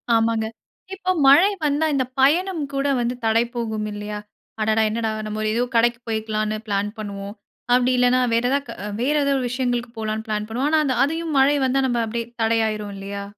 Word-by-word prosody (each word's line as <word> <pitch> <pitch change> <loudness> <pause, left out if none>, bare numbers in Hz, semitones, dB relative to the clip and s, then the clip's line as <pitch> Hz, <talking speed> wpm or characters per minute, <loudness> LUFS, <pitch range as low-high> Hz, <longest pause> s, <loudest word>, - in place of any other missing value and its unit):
ஆமாங்க. 225 -1 +1 0.5
இப்போ 370 -1 -1 0.2
மழை 315 +9 +7 0.2
வந்தா 295 +2 +1
இந்த 260 -2 +1
பயணம் 330 +5 +3
கூட 275 +1 0
வந்து 240 +1 -1
தடை 225 +1 +3
போகும் 220 -2 -2
இல்லையா? 210 0 -5 0.4
அடடா! 220 +1 +2
என்னடா 225 +1 -1 0.2
நாம 215 0 -3
ஏதோ 240 - +1
கடைக்கு 240 +1 +3
போயிருக்கலான்னு 215 -1 -1
பிளான் 200 0 0
பண்ணுவோம். 200 0 -6 0.4
அப்டி 250 +1 +3
இல்லைன்னா, 250 +1 +4
வேறு 235 +2 +2
ஏதா 280 - +2 0.2
அ - - -4
வேறு 290 +5 +1
ஏதாவது 280 0 +2
ஒரு 255 - -2
விஷயங்களுக்கு 245 -2 -2
போகலான்னு 220 0 -3
பிளான் 215 0 -2
பண்ணுவோம். 255 +6 0
ஆனா, 315 - +4
அந்த 260 - 0
அதையும் 325 +1 -2
மழை 280 +2 +5
வந்தா 260 +1 +1
நம்ப 240 -1 0
அப்டீயே 230 +1 -4
தடை 225 0 +2
ஆயுரும் 210 -1 -4
இல்லையா? 200 +1 -6
235 Hz, 185 wpm, -22 LUFS, 215-270 Hz, 0.5 s, மழை